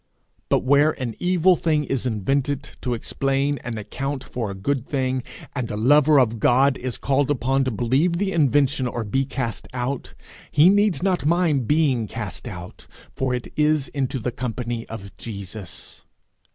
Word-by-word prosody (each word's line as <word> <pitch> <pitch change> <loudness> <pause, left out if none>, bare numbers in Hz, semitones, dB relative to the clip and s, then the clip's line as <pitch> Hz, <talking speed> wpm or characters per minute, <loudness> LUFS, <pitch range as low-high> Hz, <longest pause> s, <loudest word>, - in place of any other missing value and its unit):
But - - +2
where 140 +4 +3
an 120 -4 -3
evil 180 0 +4
thing 155 -2 +1
is 135 -2 -2
invented 135 +6 0 0.2
to 125 -2 -1
explain 135 +4 -1
and 120 -2 -5
account 135 +6 -4
for 115 -4 -4
a 100 - -5
good 125 +6 -2
thing, 130 -2 0 0.3
and 125 -4 -3
a 105 - -3
lover 145 +5 +5
of 115 -3 +1
God 130 +5 +4
is 125 -1 -4
called 140 +1 +1
upon 135 -1 +1
to - - +1
believe 130 - +1
the 195 +3 0
invention 140 -4 +2
or 120 -1 -3
be 135 +6 0
cast 125 -4 -4
out, 125 +2 -3 0.4
he 150 +5 +6
needs 205 -3 +3
not 185 -6 +1
mind 160 -7 +2
being 140 -7 +2
cast - - -6
out, 85 +1 -9 0.3
for 130 -1 0
it 125 - -6
is 150 -2 +2
into 135 -1 -2
the 125 0 -2
company 120 -1 -4
of 100 -3 -8
Jesus. 100 -3 -8
135 Hz, 165 wpm, -23 LUFS, 120-145 Hz, 0.4 s, he